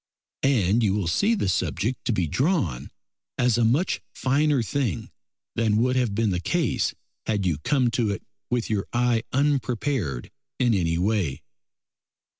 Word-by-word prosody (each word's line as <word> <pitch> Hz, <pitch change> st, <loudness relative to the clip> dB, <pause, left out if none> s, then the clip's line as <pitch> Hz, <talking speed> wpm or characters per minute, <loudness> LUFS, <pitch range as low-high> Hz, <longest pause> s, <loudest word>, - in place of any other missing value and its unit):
And 115 Hz, -5 st, +3 dB
you 100 Hz, -3 st, +2 dB
will 105 Hz, -3 st, -1 dB
see 200 Hz, -, +2 dB
the 195 Hz, -, -1 dB
subject 110 Hz, +6 st, -1 dB
to -, -, +1 dB
be 95 Hz, -6 st, +1 dB
drawn 95 Hz, -, 0 dB, 0.5 s
as 125 Hz, -1 st, +2 dB
a -, -, +3 dB
much 135 Hz, +11 st, +1 dB
finer 140 Hz, 0 st, +2 dB
thing 120 Hz, -, -2 dB, 0.4 s
than 110 Hz, -2 st, +1 dB
would 125 Hz, +3 st, +2 dB
have 120 Hz, -6 st, +1 dB
been 110 Hz, -1 st, +1 dB
the 90 Hz, -, 0 dB
case 90 Hz, -, 0 dB, 0.3 s
had 105 Hz, -3 st, 0 dB
you 80 Hz, -5 st, 0 dB
come 125 Hz, -, +1 dB
to 115 Hz, -2 st, +1 dB
it 100 Hz, -, -3 dB, 0.3 s
with 120 Hz, -2 st, 0 dB
your 105 Hz, -3 st, -1 dB
eye 120 Hz, -1 st, +2 dB
unprepared 130 Hz, -, 0 dB, 0.3 s
in 120 Hz, -3 st, +3 dB
any 85 Hz, -4 st, +1 dB
way. 90 Hz, -7 st, 0 dB
115 Hz, 155 wpm, -25 LUFS, 95-130 Hz, 0.5 s, And